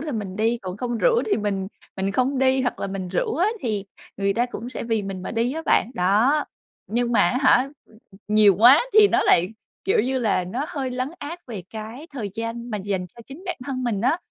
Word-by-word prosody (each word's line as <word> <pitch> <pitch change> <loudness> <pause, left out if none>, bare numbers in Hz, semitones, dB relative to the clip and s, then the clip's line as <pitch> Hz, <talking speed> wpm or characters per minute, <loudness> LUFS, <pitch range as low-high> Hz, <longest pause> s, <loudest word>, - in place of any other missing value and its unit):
là 300 -1 -4
mình 200 -4 -4
đi, 225 +2 +1
còn 185 0 -5
không 240 +1 -3
rủ 475 - +3
thì 425 - +2
mình 200 -3 -2 0.3
mình 195 +1 -1
không 260 +4 +1
đi, 265 0 +3
hoặc 245 - -2
là - - -1
mình 195 -2 -5
rủ 180 - -1
á 360 - +3
thì 210 -5 -2 0.3
người 200 0 0
ta 240 +2 +1
cũng 245 -1 -7
sẽ - - -6
vì 225 -2 0
mình 195 -2 -5
mà - - -5
đi 230 +2 0
á 320 +2 -4
bạn, 230 - +3
đó. 215 +11 +3 0.4
Nhưng 240 +2 -1
mà 215 - +4
á 250 - 0
hả, 260 0 +5 0.2
ừ, - - -24 0.2
ừ, 195 - -16
nhiều 210 -2 +6
quá 250 +7 +8
thì 425 -1 +7
nó - - +2
lại, 175 +2 +4 0.4
kiểu 195 - +3
như 260 +3 0
là, 210 -6 +1
nó 240 +11 -3
hơi 270 -3 -3
lấn 255 +1 -2
át 320 +5 -6
về 215 -7 -6
cái 225 +7 -8
thời 215 -7 -4
gian 230 +1 -5
mà 210 - -2
dành 190 -2 -3
cho 235 +6 -15
chính 280 +7 -11
bản 360 - -2
thân 255 -2 -3
mình 220 -5 -1
á. 255 +8 +2
230 Hz, 245 wpm, -23 LUFS, 200-260 Hz, 0.4 s, quá